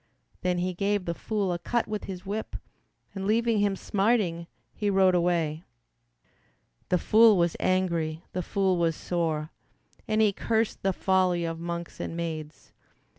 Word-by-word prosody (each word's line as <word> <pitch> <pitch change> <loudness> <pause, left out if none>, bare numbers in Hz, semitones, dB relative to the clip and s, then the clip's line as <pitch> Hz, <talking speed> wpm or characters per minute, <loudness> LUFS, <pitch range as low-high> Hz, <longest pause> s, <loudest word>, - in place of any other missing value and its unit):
Then 180 -1 0
he 180 +1 -1
gave 200 +1 0
the 170 - -1
fool 200 0 -2
a 175 - -3
cut 235 +7 -1
with 215 -1 -4
his 185 -1 -7
whip 210 +3 -4 0.6
And 195 -1 -4
leaving 230 0 +2
him 200 -1 +2
smarting, 195 -5 0 0.3
he 210 - -1
rode 190 -1 +4
away. 170 -3 +1 1.3
The 180 - +3
fool 220 +3 +6
was 170 -1 +2
angry, 170 -3 0
the 180 - -1
fool 190 0 +1
was 165 -1 +1
sore, 160 -3 -2 0.6
And 215 0 +1
he 215 -2 +4
cursed 225 +2 -1
the 195 - +2
folly 185 -2 +1
of 165 0 -4
monks 170 0 -5
and 165 - -4
maids. 155 -2 -6
185 Hz, 155 wpm, -27 LUFS, 170-205 Hz, 1.3 s, fool